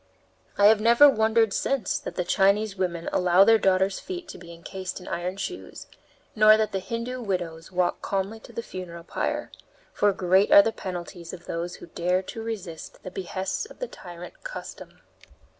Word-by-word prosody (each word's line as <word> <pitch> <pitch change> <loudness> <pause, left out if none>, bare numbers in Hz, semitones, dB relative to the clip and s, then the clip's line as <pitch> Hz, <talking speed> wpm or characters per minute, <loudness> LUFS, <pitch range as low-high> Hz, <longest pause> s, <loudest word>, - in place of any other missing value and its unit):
I 200 - +5
have 215 0 +6
never 235 +6 +7
wondered 220 -4 +3
since 270 -7 0
that - - -7
the 180 - 0
Chinese 200 +3 +2
women 175 -3 -2
allow 180 +1 +5
their 225 +2 +5
daughters' 190 0 +2
feet 360 -2 -7
to - - -9
be 170 -1 -11
encased 185 +3 -7
in 180 - -12
iron 180 +2 -3
shoes, 190 -1 -6 0.5
nor 215 0 +7
that 220 -1 0
the 195 - -1
Hindoo 235 +5 -4
widows 175 -5 -4
walk 180 -1 0
calmly 195 +3 -2
to - - -14
the 235 - -5
funeral 175 -5 -8
pyre; - - -3 0.4
for 205 - +3
great 190 +1 +2
are 300 0 +10
the 225 - 0
penalties 175 -4 -7
of 175 -2 -10
those 170 +1 -4
who - - -11
dare 180 +2 -1
resist 210 -8 -7
the 185 - -7
behests 190 - -3
of - - -15
the - - -4
tyrant 175 - -11
Custom. - - -9
190 Hz, 175 wpm, -26 LUFS, 180-220 Hz, 0.5 s, are